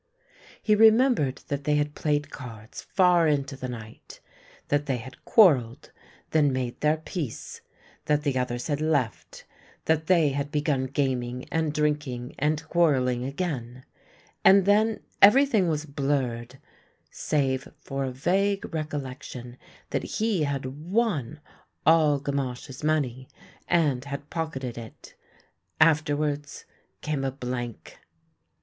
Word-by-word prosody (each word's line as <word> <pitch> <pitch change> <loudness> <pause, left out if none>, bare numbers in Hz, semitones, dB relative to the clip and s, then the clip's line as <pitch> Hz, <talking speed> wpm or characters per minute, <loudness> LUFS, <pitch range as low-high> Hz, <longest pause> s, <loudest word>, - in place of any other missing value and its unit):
He 215 - +3
remembered 220 - +4
that 140 0 -3
they 150 - +2
had 150 0 0
played 145 -1 -1
cards 115 -5 -9
far 180 -3 +3
into 140 -2 0
the 130 -1 -6
night; 115 -3 -10 0.5
that 145 0 +1
they 135 -2 0
had 125 +2 -11
quarrelled, 135 - +4 0.4
then 150 -3 +3
made 130 -2 -3
their 150 +1 +3
peace; 160 - -6 0.4
that 150 0 +1
the 140 -3 0
others 125 -1 -2
had 150 -1 -2
left; 145 -7 -2 0.4
that 160 0 +1
they 170 -5 +4
had 140 +1 -2
begun 145 -3 0
gaming 125 -2 -2
and 160 -2 0
drinking 150 -4 -2
and 155 +2 0
quarrelling 130 -8 +2
again 130 -5 -4 0.3
— - - -31
and 195 -1 +7
then 215 +2 +3 0.2
everything 220 -2 +6
was 155 -1 -1
blurred, 135 -4 -2 0.5
save 135 -3 -1
for 135 0 -4
a 130 - -2
vague 195 +10 0
recollection 135 -5 -5 0.4
that - - 0
he 215 -8 0
had 140 -2 -3 0.2
won 180 - 0 0.5
all 155 -3 +5
Gamache's 135 -1 -4
money 135 -5 0 0.4
and 150 -7 +2
had 140 +1 -7
pock 160 -2 -3
eted 125 -3 -5
it. 115 -2 -12 0.7
Afterwards 150 -2 +1 0.4
came 150 -3 -2
a 135 - 0
blank. 125 - -6
145 Hz, 130 wpm, -26 LUFS, 130-160 Hz, 0.7 s, and